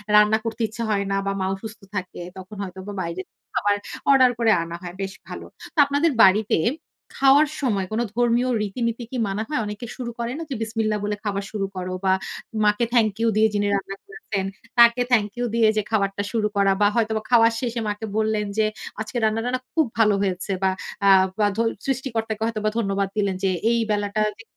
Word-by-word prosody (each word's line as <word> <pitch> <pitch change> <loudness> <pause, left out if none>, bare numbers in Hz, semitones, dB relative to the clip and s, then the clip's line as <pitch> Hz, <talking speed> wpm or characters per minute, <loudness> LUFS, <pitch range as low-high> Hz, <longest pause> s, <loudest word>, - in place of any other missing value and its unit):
রান্না 210 +1 +6
করতে 225 +1 -4
ইচ্ছা 225 +2 -6
হয় 200 -1 +1
না 195 - +1
বা - - +1
মা - - 0
অসুস্থ 220 +2 -9
থাকে, 185 -2 -4 0.2
তখন 190 +3 -9
হয়তোবা 190 +2 -7
বাইরে 170 +2 -4 0.3
খাবার 205 0 +2 0.4
অর্ডার 260 -2 +6
করা 225 -1 +4 0.3
হয়। 175 0 -6
বেশ 195 0 -3
ভালো। - - -7 0.3
তো - - -56
আপনাদের 285 +3 +2
বাড়িতে 200 +1 +4 0.6
খাওয়ার 275 +3 +6
সময় 205 -8 0
কোন 220 - -1 0.2
ধর্মীয় 240 +1 +2
রীতিনীতি 235 +3 -2
কি 255 - -3
মানা 200 +3 -2
হয়? 300 - 0
অনেকে 210 +3 -6
শুরু 240 -2 -4
করে 235 +1 -2
না 330 - -4
যে 265 - -3
বিসমিল্লাহ 220 -1 -1
বলে 210 0 -1
খাবার 200 -1 -2
শুরু 200 -2 -2
করো 185 0 -4
বা 190 - +4 0.5
মাকে 210 +3 +3
থ্যাংক 220 -3 +4
ইউ 230 - +3
দিয়ে 220 - +5
যিনি 205 0 +1
রান্না 195 0 -4
করেছেন 225 - -4 0.3
তাকে 235 +1 +7
থ্যাংক 210 -3 +3
ইউ 245 - 0
দিয়ে 225 -2 +4
যে - - +3
খাবারটা 200 -1 0
শুরু 220 -3 +1
করা 195 -1 +4
বা 205 - +6
হয়তোবা 220 -1 +1
খাওয়ার 230 -1 +6
শেষে 235 -2 -2
মাকে 210 +2 -4
বললেন 215 -1 +1
যে, 215 - +4 0.4
আজকে 220 +3 -4
রান্না 220 +1 +2
টান্না 250 +1 -1
খুব 320 -3 +3
ভালো 210 -2 +5
হয়েছে। 190 0 -2
বা 190 - +4 0.4
আ - - +7 0.3
বা 210 - +4 0.4
সৃষ্টিকর্তাকে 230 -5 -2
হয়তোবা 215 -2 -1
ধন্যবাদ 195 -2 0
দিলেন 200 -2 +1
যে 190 - +3 0.2
এই 235 - +2
বেলাটা 205 +1 0 0.2
যে 225 - -12
215 Hz, 195 wpm, -23 LUFS, 200-235 Hz, 0.6 s, তাকে